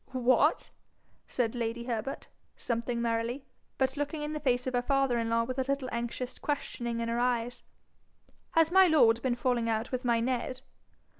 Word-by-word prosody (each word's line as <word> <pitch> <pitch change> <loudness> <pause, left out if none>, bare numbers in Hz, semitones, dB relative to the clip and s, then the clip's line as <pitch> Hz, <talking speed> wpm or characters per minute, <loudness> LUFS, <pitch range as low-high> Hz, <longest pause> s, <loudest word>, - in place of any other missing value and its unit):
'What!' 255 0 +2 0.6
said 230 -3 -1
lady 235 -1 -3
Herbert, 235 +2 -4 0.3
something 235 0 -2
merrily, 235 +3 -1 0.3
but 265 0 +1
looking 290 +1 -3
in 300 +1 -3
the 305 - -3
face 250 -4 +1
of 255 - -2
her 245 - +2
father 270 -2 +1
in 230 0 -1
law 230 0 +2
with 255 +2 -4
a 265 +1 0
little 275 -2 -1
anxious 240 +2 -4
questioning 240 -5 -3
in 230 - -2
her 230 +1 -1
eyes, 245 -1 0 0.9
'has 325 0 +4
my 380 0 +7
lord 235 -8 +5
been 250 -1 0
falling 240 -1 0
out 220 +1 -1
with 255 0 -2
my 235 -2 +2
Ned?' 255 +1 -2
245 Hz, 175 wpm, -30 LUFS, 235-265 Hz, 0.9 s, my